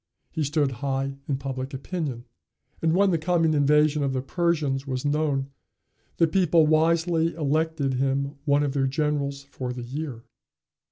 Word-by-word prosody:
He 160 - -2
stood 145 -1 +1
high 135 0 -2
in 140 - 0
public 135 0 -5
opinion. 135 -5 -4 0.6
And 165 0 +2
when 195 +1 +4
the 165 - +1
coming 165 -1 +2
invasion 150 +1 +3
of 135 -1 0
the 130 - -1
Persians 150 -4 0
was 130 0 -3
known, 145 -2 0 0.7
the 165 - +5
people 165 -1 +3
wisely 165 +1 +2
elected 155 -2 0
him 135 +2 0
one 145 -1 +3
of 140 -2 -1
their 135 -1 +1
generals 140 -1 -1
for 130 -2 -6
the 125 -1 -6
year. 130 -2 -5
145 Hz, 155 wpm, -25 LUFS, 135-160 Hz, 0.7 s, the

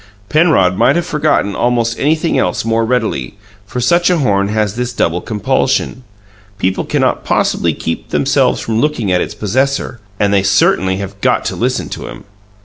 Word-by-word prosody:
Penrod 150 - +3
might 135 +9 +3
have 170 -1 0
forgotten 150 - 0
almost 120 -1 0
anything 155 +3 +1
else 90 +4 0
more 115 0 +1
readily; 110 - -2 0.3
for 125 +3 -4
such 170 +9 +3
a 180 - +2
horn 100 -9 +1
has 105 -1 -1
this 125 0 -3
double 85 -6 0
compulsion: 110 +4 -1 0.5
people 95 -2 -1
cannot - - 0
possibly - - +1
keep 80 - -5
themselves - - +1
from 115 0 -1
looking 125 -10 0
at 90 -1 +2
its - - -4
possessor 130 +3 -1 0.2
and 100 -1 +2
they 100 - +4
certainly 95 -1 +2
have 100 0 -7
GOT - - +1
to - - -2
listen - - -1
to - - -6
him! - - -10
110 Hz, 170 wpm, -15 LUFS, 100-135 Hz, 0.5 s, they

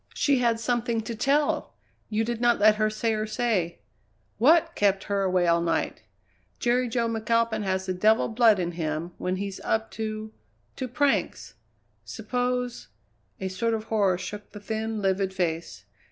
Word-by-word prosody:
"She 280 -3 +2
had 235 -2 +2
something 235 -1 0
to 225 +2 -5
tell! 280 +5 +1 0.3
You 215 +1 0
did 235 0 -3
not 240 0 +4
let 210 +1 +5
her 215 0 +2
say 225 +1 -1
her 215 0 -2
say. 215 -7 -1 0.6
What 330 +7 +5
kept 200 - +2
her 200 -1 -1
away 185 -2 +2
all 170 0 +3
night? 165 -1 -1 0.6
Jerry 245 +1 +1
Jo 235 0 0
McAlpin 230 0 0
has 190 -1 -1
the 185 - -1
devil 215 +5 +3
blood 225 -2 +4
in 175 -2 -1
him 165 0 -3
when 180 0 -1
he's 195 0 -4
up 220 0 -1
to 215 0 -5 0.4
to 260 - -3
pranks. 275 +3 0 0.5
Suppose 250 -1 -3 0.3
" - - -42
A 190 - -2
sort 225 +5 -1
of 220 - -4
horror 195 -4 +3
shook 205 +3 -8
the 210 - -8
thin, 220 0 -3
livid 190 0 0
face. 165 - -3
215 Hz, 170 wpm, -26 LUFS, 190-235 Hz, 0.6 s, let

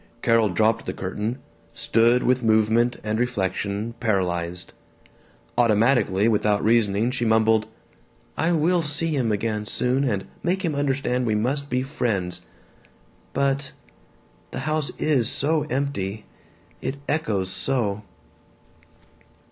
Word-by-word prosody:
Carol 115 -2 +3
dropped 110 +5 +1
the - - -2
curtain, 105 +6 -3 0.4
stood 115 +2 +3
with 130 0 +2
movement 110 +2 +2
and 110 +1 -1
reflection 100 -1 -2
paralyzed. 90 -5 -1 0.9
Automatically, 110 -3 +3
without 105 -2 +2
reasoning, 110 0 +2
she 125 -2 -2
mumbled, 110 -1 +3 0.7
"I 165 +2 +1
will 170 +2 +2
see 155 +2 -1
him 120 -5 0
again 105 0 -2
soon 130 +5 +1
and 105 -8 -1 0.2
make 185 +2 -1
him 160 - 0
understand 135 -3 0
we 110 - +1
must 140 +6 -1
be 125 +1 0
friends. 105 - -2 0.9
But 140 0 0 0.8
The - - -5
house 155 -2 -1
is 130 -7 +2
so 155 +2 +2
empty. 110 -7 -2 0.6
It 140 - -3
echoes 105 - -1
so." 105 -3 +1
115 Hz, 115 wpm, -24 LUFS, 105-135 Hz, 0.9 s, Carol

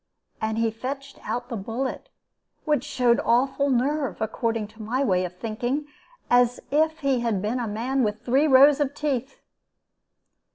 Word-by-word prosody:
And 220 0 -1
he 230 0 +1
fetched 275 +4 -6
out 245 0 -3
the 240 - -3
bullet 230 +6 -4 0.6
which 300 -5 +1
showed 250 -4 +2
awful 270 +4 +2
nerve, 275 +2 0
according 225 0 -1
to 220 +1 -14
my 245 +6 -1
way 185 -7 +2
of 180 0 -8
thinking 240 +8 -2 0.4
as 245 0 +3
if 315 +2 +1
he 275 -3 +1
had 230 -4 0
been 215 +6 -1
a 235 - -2
man 240 +6 -1
with 215 0 -2
three 270 +5 +3
rows 280 +1 +7
of 285 -1 -1
teeth. 275 -3 -2
245 Hz, 160 wpm, -25 LUFS, 225-275 Hz, 0.6 s, rows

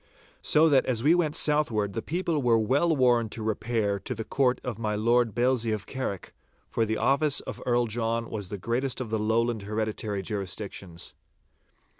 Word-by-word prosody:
So 155 +1 +4
that 140 -4 +3
as 120 -3 +1
we 155 +4 +5
went 165 -4 +1
southward 115 -10 +1
the 115 - -3
people 165 0 -1
were 120 -3 +4
well 140 +10 +2
warned 120 -4 +3
to 110 - -5
repair 110 -2 -1
to 125 - -5
the 110 - -4
Court 130 +2 +1
of 115 -4 -5
my 105 -2 -1
Lord 115 +1 +2
Bailzie 120 -2 +2
of 105 -2 -4
Carrick, 130 -8 -5 0.3
for 115 - 0
the 110 0 -1
office 140 +3 +3
of - - -8
Earl 120 0 +3
John 115 +1 -2
was 100 -4 -5
the 105 - -4
greatest 120 +7 -1
of 120 -4 -5
the 110 - 0
Lowland 110 +1 +1
hereditary 105 -1 -3
jurisdictions. 95 -4 -6
115 Hz, 180 wpm, -27 LUFS, 110-130 Hz, 0.3 s, we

